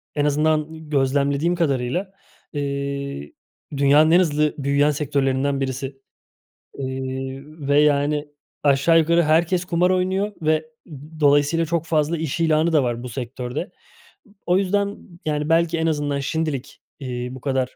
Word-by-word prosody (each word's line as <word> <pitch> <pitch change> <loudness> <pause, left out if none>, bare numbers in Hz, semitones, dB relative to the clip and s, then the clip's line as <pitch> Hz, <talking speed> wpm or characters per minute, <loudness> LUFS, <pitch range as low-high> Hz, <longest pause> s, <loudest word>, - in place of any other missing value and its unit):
en 145 -1 +1
azından 155 +1 0
gözlemlediğim 140 +3 +1
kadarıyla, 160 +3 -1 0.4
eee, 140 - -4 0.4
dünyanın 145 +3 +5
en 175 - +6
hızlı 150 -3 +1
büyüyen 140 +1 +2
sektörlerinden 140 -1 0
birisi, 135 0 -4 0.8
iii, 130 0 -4
ve 150 -1 +1
yani 150 0 +2 0.3
aşağı 145 +3 +4
yukarı 170 +2 +3
herkes 170 +3 +2
kumar 180 0 +1
oynuyor 190 +3 0
ve, 155 0 +1 0.2
ııı, 155 +1 -12
dolayısıyla 145 +3 +3
çok 165 0 -1
fazla 160 +1 +1
iş 160 0 -3
ilanı 160 0 +2
da 150 -3 +4
var 120 -1 -2
bu 125 - -6
sektörde. 125 +2 -5 0.7
B - - -23 0.2
o 180 +1 +3
yüzden 200 +1 0 0.3
yani 150 -1 -1
belki 165 0 +2
en 160 0 0
azından 145 -2 -1
şimdilik, 145 -1 -3 0.2
iii, 125 -2 -5
bu 130 - -10
kadar 130 -2 -1
150 Hz, 140 wpm, -22 LUFS, 135-160 Hz, 0.8 s, en